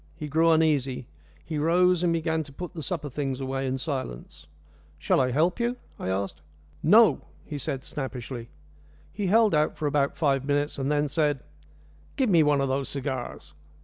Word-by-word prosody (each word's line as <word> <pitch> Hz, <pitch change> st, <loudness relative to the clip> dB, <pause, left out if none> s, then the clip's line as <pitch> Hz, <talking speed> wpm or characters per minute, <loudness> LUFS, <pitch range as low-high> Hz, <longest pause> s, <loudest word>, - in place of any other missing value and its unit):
He 155 Hz, -2 st, -6 dB
grew 160 Hz, +3 st, +3 dB
uneasy. 145 Hz, -6 st, +2 dB, 0.4 s
He 155 Hz, -, -3 dB
rose, 175 Hz, +3 st, +3 dB
and 175 Hz, -1 st, +2 dB
began 160 Hz, -1 st, 0 dB
to 140 Hz, -, -12 dB
put 180 Hz, +6 st, -7 dB
the 165 Hz, -, -6 dB
supper 160 Hz, -2 st, -3 dB
things 135 Hz, -1 st, -3 dB
away 135 Hz, 0 st, -2 dB
in 130 Hz, +1 st, -1 dB
silence. 130 Hz, -, -5 dB, 0.5 s
"Shall 75 Hz, -, +2 dB
I 130 Hz, -, +2 dB
help 160 Hz, -, +1 dB
you?" 240 Hz, +1 st, 0 dB, 0.2 s
I -, -, -3 dB
asked. 95 Hz, +1 st, -2 dB, 0.4 s
"No!" 215 Hz, +7 st, +6 dB, 0.2 s
he 145 Hz, -2 st, -5 dB
said 135 Hz, 0 st, -3 dB
snappishly. 125 Hz, -4 st, -6 dB, 0.6 s
He 200 Hz, +1 st, -2 dB
held 220 Hz, +1 st, +4 dB
out 150 Hz, 0 st, +2 dB
for 155 Hz, -, -3 dB
about 140 Hz, -1 st, +1 dB
five 140 Hz, -4 st, +2 dB
minutes, 145 Hz, +1 st, 0 dB
and 135 Hz, +2 st, 0 dB
then 150 Hz, 0 st, +2 dB
said, 145 Hz, -2 st, 0 dB, 0.7 s
"Give 255 Hz, -6 st, +1 dB
me 170 Hz, -3 st, +6 dB
one 145 Hz, -2 st, +3 dB
of 135 Hz, -, +1 dB
those 135 Hz, +1 st, -1 dB
cigars." 130 Hz, -, -5 dB
145 Hz, 180 wpm, -26 LUFS, 135-165 Hz, 0.7 s, No